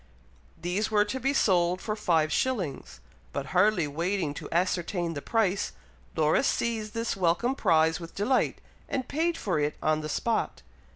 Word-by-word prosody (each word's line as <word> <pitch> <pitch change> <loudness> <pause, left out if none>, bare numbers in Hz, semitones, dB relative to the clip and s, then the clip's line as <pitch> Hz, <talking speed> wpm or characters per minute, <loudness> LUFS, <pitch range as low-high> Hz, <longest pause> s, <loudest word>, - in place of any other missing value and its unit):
These 180 +6 -1
were 210 -1 +3
to 260 +5 -3
be 270 +2 +1
sold 180 -8 +2
for 215 +1 -3
five 165 -7 +1
shillings; 180 - -2 0.3
but 140 - -3
hardly 185 -3 +3
waiting 170 +1 -1
to - - -8
ascertain 175 0 0
the 145 - -5
price, 205 -2 0 0.4
Laura 155 +4 +3
seized 225 -5 -1
this 230 0 -1
welcome 185 +7 +1
prize 165 -9 +3
with 165 -1 -10
delight, 250 +6 +1 0.3
and 260 -2 -2
paid 330 +3 0
for 180 -6 -1
it 150 0 0
on 155 0 +1
the 155 - -5
spot. 230 +8 -1
185 Hz, 160 wpm, -28 LUFS, 165-220 Hz, 0.4 s, were